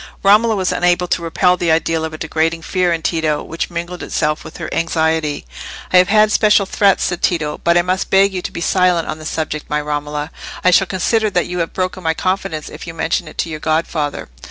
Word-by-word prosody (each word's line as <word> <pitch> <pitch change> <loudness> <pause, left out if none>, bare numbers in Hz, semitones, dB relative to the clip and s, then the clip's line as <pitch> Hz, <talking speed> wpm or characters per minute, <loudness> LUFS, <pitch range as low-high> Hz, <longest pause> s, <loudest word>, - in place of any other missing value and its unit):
Romola 215 +3 +5
was 185 -2 0
unable 180 0 +1
to 170 - 0
repel 180 +2 +2
the 175 -1 -1
idea 160 0 +1
of 160 0 -3
a 155 - -7
degrading 165 +1 -1
fear 180 0 0
in 165 -1 -2
Tito, 155 -3 0
which 165 - -4
mingled 175 +1 -5
itself 150 +1 -1
with - - -10
her - - -5
anxiety. 160 - 0 0.5
"I - - +7
have 180 0 +6
had 215 +1 +4
special 210 -2 +4
threats," 195 0 +2
said 175 -2 -2
Tito, 155 -4 0
"but 170 0 +3
I 175 - +4
must 185 +1 -1
beg 195 0 +4
you 185 - -3
to - - -5
be 170 - -6
silent 180 -1 +2
on 155 - -4
the 155 - -6
subject, 155 -2 -4
my 150 - 0
Romola. 150 +1 -3 0.3
I 180 - +5
shall 190 +1 +4
consider 215 +4 +1
that 180 -3 0
you 180 0 -4
have 165 - -2
broken 185 0 -2
my 160 -2 0
confidence, 185 -4 -2
if - - -9
you 165 - -7
mention 165 +1 -1
it - - -12
to - - -1
your 155 -1 -5
godfather." 155 -2 -1
170 Hz, 230 wpm, -17 LUFS, 160-185 Hz, 0.5 s, I